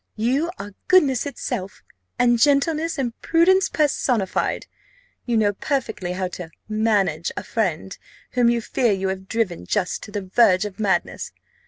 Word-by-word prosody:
"You 260 +9 0
are 205 0 -8
goodness 285 -8 +4
itself, 200 -8 -5 0.3
and 240 -1 +3
gentleness, 305 +4 +2
and 245 -4 -1
prudence 375 +4 +3
personified. 255 - 0 0.6
You 235 -2 +1
know 205 -2 +2
perfectly 210 - -2
how 185 0 -2
to 175 -2 -8 0.2
manage 210 -7 +1
a - - -3
friend, 190 -4 -2 0.4
whom 245 -1 +3
you 235 0 +1
fear 235 +1 +1
you 190 0 -1
have 190 0 -5
driven 225 -7 -2
just 195 -4 -1
to 210 - -10
the 205 -1 -3
verge 185 0 +3
of 205 0 -8
madness. 205 -3 -1
225 Hz, 150 wpm, -22 LUFS, 190-270 Hz, 0.6 s, goodness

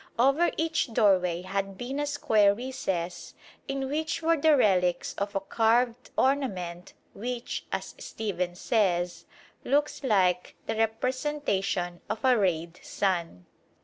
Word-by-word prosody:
Over 275 +8 +4
each 320 -6 0
doorway 180 -6 +3
had 195 0 -3
been 260 +5 -4
a 290 - -1
square 215 -8 +3
recess 195 -8 -4 0.3
in 275 -1 -2
which 315 +3 -2
were 330 +1 +4
the 310 -1 +4
relics 180 -6 +2
of 200 0 -4
a - - +2
carved 230 +4 +1
ornament 190 -10 -1 0.2
which, 240 +3 -5
as - - -4
Stephens 180 -4 -4
says, 180 -6 0 0.4
looks 290 +2 0
like 185 -7 +2
the - - -2
representation 225 -6 -1
of 220 +4 -3
a 255 -1 +6
rayed 170 -5 0
sun. 170 - -2
215 Hz, 125 wpm, -28 LUFS, 180-265 Hz, 0.4 s, a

